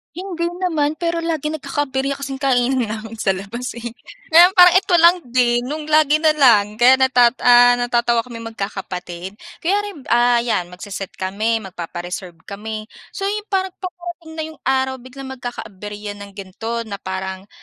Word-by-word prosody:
Hindi 355 -2 -4 0.2
naman 310 -5 +1
pero 335 +1 -2
lagi 315 -3 -1
nagkaka-aberya 280 -2 -2
kasing 275 -1 -4
kainan 260 -2 +1
namin 225 +1 -7
sa 195 -3 +1
labas 210 +6 -6
eh. 235 0 -6 0.4
Ngayon, 345 +3 +7
parang 360 -1 +7
ito 380 0 0
lang 340 +1 +7
din, 240 -1 +1
nung 300 +3 -5
lagi 305 0 +4
na 315 - +5
lang, 215 -6 +4
kaya 245 +2 +7
natat 250 -2 +5
ah, 245 0 +7
natatawa 240 -1 +1
kami 235 0 -10
magkakapatid. 190 -4 -6 0.2
Kaya 375 +5 +1
rin, 305 -10 -12
ah 240 0 +4
yan, 230 -7 -1
magse-set 190 +1 -7
kami, 210 +5 -1
magpapa-reserve 175 0 -7
kami. 215 +2 -6 0.2
So, 390 - -5
yung 415 +1 -3
parang 380 -2 -1
paparating 350 -3 -8
na 315 - -2
yung 310 - -23
araw, 265 -1 0
biglang 265 +1 -9
magkaka-aberya 210 -4 -7
ng 200 0 -9
gan'to 225 +4 -5
na 200 -2 -7
parang, 190 +1 -5
245 Hz, 160 wpm, -20 LUFS, 210-305 Hz, 0.4 s, Ngayon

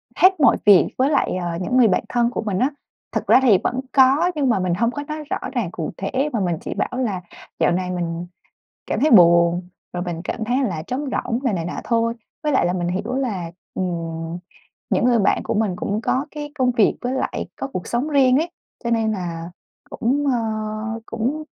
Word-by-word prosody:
hết 375 0 +5
mọi 285 - +5
việc 200 -3 +7
với 260 +2 +3
lại, 285 -9 +1
ờ, 175 - -2
những 250 +7 0
người 245 -3 +6
bạn 185 - +1
thân 240 -1 +2
của - - -2
mình 205 -4 -2
á. 260 - +3 0.4
Thực - - -3
ra - - +7
thì 235 -7 +6
vẫn 250 - -1
có 275 +6 +5
nhưng 280 -4 +1
mà 225 - +2
mình 180 -1 0
hông 230 +7 +1
có 290 +2 -5
nói 305 0 -5
rõ - - 0 0.2
ràng 230 -10 -1
cụ 165 -4 -4
thể 260 +9 -1
mà 230 - 0
mình 175 -4 0
chỉ - - -4
bảo - - -1
là 210 -8 -1 0.4
"Dạo - - +3
này 180 +1 -1
mình 170 -1 -3 0.6
cảm - - -1
thấy 310 - +3
buồn, 170 -2 +6 0.3
rồi 175 0 -2
mình 170 -2 -4
cảm 225 - -3
thấy 245 +3 +1
là 170 -10 -2
trống 265 +4 -2
rỗng," 235 -1 -1
rồi 255 -5 0
này 170 -3 -2
nọ 175 - -4
thôi, 230 -1 +1 0.3
với 300 - +1
lại - - +3
là 175 - +1
mình 175 -1 -1
hiểu 195 +7 -2
là, 200 -11 -2 0.2
ừm, 165 -2 -3 0.5
những - - +2
người 245 -2 +4
bạn 195 - +2
của - - -2
mình 210 -4 0
cũng 205 +4 -2
có 260 +4 0
cái 295 -1 -6
công 255 -3 +2
việc 230 -4 +3
với 250 +1 -2
lại 265 - -2
có 270 - -4
cuộc 185 -10 -6
sống 240 +5 -1
riêng 265 -3 +4
ấy, 330 +3 -1 0.3
cho 235 - -1
nên 225 -1 +2
là 170 -4 -4 0.4
cũng, 275 +5 0
ơ, 255 -3 +2 0.7
cũng 250 +8 -2
230 Hz, 220 wpm, -21 LUFS, 180-260 Hz, 0.7 s, việc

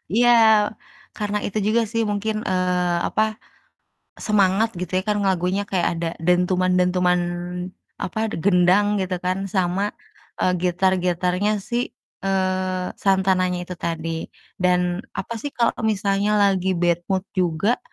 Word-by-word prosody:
Iya, 240 +1 +5 0.9
karena 210 -1 -1
itu 205 - -3
juga 230 +2 +3
sih 230 -1 +1
mungkin, 215 +1 -2
eee, 180 -1 0
apa, 215 0 0 0.8
semangat 210 0 +2
gitu 180 - -5
ya - - -1
kan, 210 0 +1
lagunya 190 +1 +1
kayak 180 -3 +1
ada 170 - -1 0.2
dentuman-dentuman, 180 0 +2 0.8
apa 185 - -4
de - - -4
gendang 185 +1 +4
gitu 185 -1 -2
kan 185 +2 -1
sama, 190 +2 0 0.5
eee, 185 - +3
gitar-gitarnya 180 +2 +1
si, 240 +3 -2 0.3
eee, 185 -1 0
Santananya 190 -2 +2
itu 180 - -7
tadi 165 -1 -3 0.4
dan 180 +1 +1
apa 235 - -4
sih 290 - -3
kalo 235 -1 +2 0.2
misalnya 200 -1 +1
lagi 190 -2 +2
bad 175 0 +2
mood 190 -1 +1
juga, 185 +5 +1
185 Hz, 125 wpm, -22 LUFS, 180-205 Hz, 0.9 s, Iya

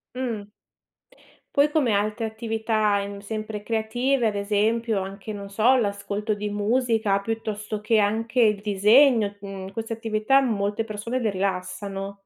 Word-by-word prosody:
Mh. 235 -5 -3 1.1
Poi 290 +1 +5
come 280 -8 +2
altre 210 +3 0
attività, 220 -2 0
mhmm, 200 0 -7
sempre 215 0 -5
creative, 235 +3 0
ad 210 - +1
esempio 215 +2 +1
anche, 195 +2 -7
non 200 -1 -7
so, 225 +6 +4
l'ascolto 205 -1 -1
di 210 0 -4
musica, 220 -1 +1
piuttosto 215 -1 -4
che 215 +1 +2
anche 225 +4 +1
il 210 -3 +4
disegno, 210 +2 +4
mhmm, 195 -1 -7
queste 225 +2 -5
attività 225 +4 +2
molte 210 -3 0
persone 225 +4 -4
le 220 - +1
rilassano. 195 +1 -3
215 Hz, 135 wpm, -24 LUFS, 200-225 Hz, 1.1 s, Poi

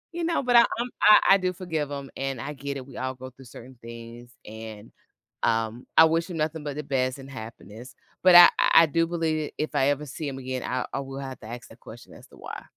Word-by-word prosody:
You 345 - -3
know, 335 -2 0
but 250 -2 +1
I 235 - +9 0.2
I'm 245 +1 -2 0.4
I 195 - +8
do 185 -1 -1
forgive 160 -5 -4
him, 140 -1 -6
and 135 -2 -4
I 150 - -6
get 140 0 -6
it. 130 0 -9
We 130 - -13
all 130 0 -4
go 130 0 -10
through 135 +2 -17
certain 125 +1 -13
things, 115 +1 -11
and, 110 0 -10 0.5
um, 115 +2 -1
I 160 - +9
wish 165 +2 0
him 170 - -6
nothing 155 0 -3
but 145 -1 -6
the 150 - -4
best 130 -2 -1
and 135 0 -11
happiness. 115 -1 -11 0.3
But 185 - +6
I 175 0 +11
I - - +3
I, - - +5
do 165 +2 0
believe 160 -3 -2
if 155 0 -4
I 135 -1 +2
ever 145 +1 -1
see 150 +3 -7
him 135 -1 -5
again, 130 -1 -5
I 125 0 -3
I 135 - -2
will 135 0 -8
have 135 -1 -7
to - - -11
ask 120 +1 -9
that - - -18
question - - -13
as - - -15
to - - -19
why. - - -9
135 Hz, 250 wpm, -25 LUFS, 125-155 Hz, 0.5 s, I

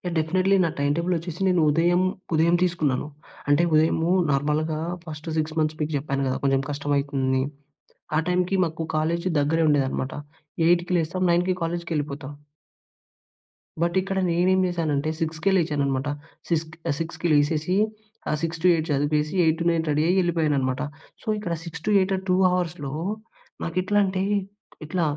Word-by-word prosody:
Definitely 185 +5 +2
నా 170 - +1
time 145 0 +2
టేబులొచ్చేసి 170 0 -2
నేను 180 -3 +3
ఉదయం 175 +4 +3 0.3
ఉదయం 165 +2 +4
తీసుకున్నాను. 155 -7 0 0.4
అంటే, 145 +4 +4
ఉదయము 160 +2 +3 0.2
నార్మల్‌గా 150 +3 0 0.2
ఫస్ట్ 155 0 -7
6 155 0 -1
మంత్స్ 155 0 0
మీకు 150 +1 -1
చెప్పాను 140 -1 -2
కదా! 130 - 0
కొంచెం 135 -1 +2
కష్టం 145 0 -2
అయితుంది. 135 -2 0 0.8
ఆ - - +4
టైమ్‌కి 180 +2 +1
మాకు 160 -1 -4
కాలేజ్ 170 +3 0
దగ్గరే 160 +3 +2
ఉండేదన్నమాట. 135 -2 0 0.5
8కి 175 +1 +3
లేస్తాం 180 +3 -1
9కి 180 +2 +2
కాలేజ్‌కెవెళ్ళిపోతా. 155 -5 -3 1.5
బట్, 170 +1 +1
ఇక్కడ 195 0 -3
నేనేం 185 +2 +3
చేశానంటే, 155 -4 -1
6కే 160 +4 0
లేచాననమాట. 145 -4 0 0.4
సిక్స్ 165 -1 +1 0.2
ఆహ్, 145 - +1
6కి 165 +1 -3
లేసేసి, 150 +4 +2 0.6
ఆ - - +1
6-8 165 0 +2
చదివేసి 150 +2 0
8-9 165 +1 +2
రెడీయ్యెళ్ళిపోయాననమాట. 150 -4 +1 0.4
సో, - - -20
ఇక్కడ 175 -5 -3
6-8 190 +4 +1
ఆ - - -3
2 180 - +4 0.2
అవర్స్‌లో 165 -6 -2 0.7
నాకు 165 +1 -4
ఎట్లా 205 +3 +1
అంటే, 190 0 -1 0.6
ఇట్లా 175 +2 -1
160 Hz, 130 wpm, -24 LUFS, 145-175 Hz, 1.5 s, ఉదయం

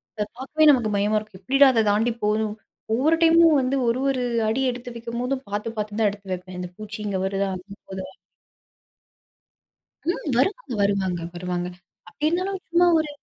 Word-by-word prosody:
அத 210 - -1
பார்க்கவே 305 +4 +1
நமக்கு 240 -5 +2
பயமா 210 +2 +2
இருக்கும். 210 -3 -13
எப்படிடா 275 +7 +5
அத 225 - +3
தாண்டி 220 +4 +2
போறோம்? 215 0 0 0.4
ஒவ்வொரு 300 +8 +3
டைமும் 330 -2 +6
வந்து 255 +1 0
ஒரு 235 +2 +1
ஒரு 255 -2 0 0.2
அடி 225 +5 0
எடுத்து 245 0 -8
வைக்கும்போதும் 245 +3 -3
பார்த்து 205 +2 -3
பார்த்து 210 0 -3
தான் 210 -2 +4
எடுத்து 200 -2 -10
வைப்பேன். 180 0 -7
இந்த 180 - -5
பூச்சி 215 0 -7
இங்க 200 -2 -1
வருதா? 195 0 -1
அங்க 190 +2 -10
போகுதான்னு. 190 0 -7 1.9
ம். - - 0 0.2
வருவாங்க, 410 - 0
வருவாங்க, 190 -3 0
வருவாங்க. 180 0 -3 0.4
அப்படி 295 +12 -2
இருந்தாலும் 370 +2 -2
சும்மா 350 +1 +4
ஒரு 310 -1 -2
220 Hz, 165 wpm, -24 LUFS, 200-270 Hz, 1.9 s, டைமும்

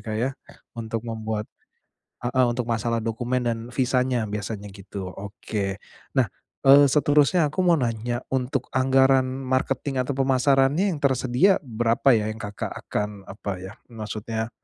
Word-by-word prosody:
Kak 110 -2 -4
ya, 125 +4 0 0.4
untuk 115 -1 -4
membuat 110 -2 -3 0.7
heeh 125 +1 +1
untuk 120 0 -2
masalah 115 0 0
dokumen 120 +2 -1
dan 115 -1 0
visanya, 125 -1 +1
biasanya 105 -1 -5
gitu, 100 0 -7
oke. 100 +1 -4 0.4
Nah, - - +5 0.4
eee, 140 +1 +9
seterusnya 150 +3 +3
aku 170 +6 -1
mau 170 -2 +5
nanya, 120 -1 -2
untuk 130 0 -1
anggaran 135 +1 +4
marketing 130 0 -1
atau 135 +3 -2
pemasarannya 135 +6 +3
yang - - -4
tersedia 135 - +3
berapa 120 +3 +2
ya 105 0 -1
yang 110 +1 -6
Kakak 105 0 -5
akan 105 -1 -4
apa 100 0 -5
ya, 95 0 -8
maksudnya, 110 0 -5
120 Hz, 140 wpm, -24 LUFS, 110-135 Hz, 0.7 s, eee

